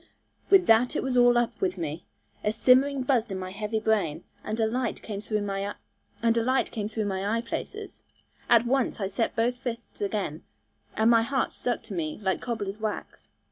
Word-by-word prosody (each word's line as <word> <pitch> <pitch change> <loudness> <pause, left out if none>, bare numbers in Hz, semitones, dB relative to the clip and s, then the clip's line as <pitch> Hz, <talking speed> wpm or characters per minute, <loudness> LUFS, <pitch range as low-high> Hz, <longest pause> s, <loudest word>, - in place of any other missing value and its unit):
With 385 -2 +6
that 225 +2 +4
it - - 0
was 260 -1 -1
all 245 -1 +6
up 240 -1 0
with 185 0 0
me. 160 -1 -4 0.4
A 210 - +2
simmering 260 +4 +4
buzzed 240 -4 +1
in 190 - -2
my 185 0 -5
heavy 210 +2 -2
brain, 210 -8 0 0.2
and 215 +2 -3
a 225 - +3
light 240 +1 -2
came 205 -2 -5
through 215 -1 -1
my 200 0 -3 0.5
eyeplaces. 225 -3 -1 0.5
At 235 0 +6
once 255 -1 +1
I 200 - -1
set 200 +4 -1
both 240 +2 +1
fists 240 -4 -6
again, 195 -6 -2 0.6
and 220 +2 +5
my 230 -1 +6
heart 265 +3 -1
stuck 245 -2 -2
to 220 -2 -8
me 155 -4 -3
like 190 -1 0
cobbler's 215 -4 -4
wax. 215 -1 -5
220 Hz, 170 wpm, -27 LUFS, 200-240 Hz, 0.6 s, With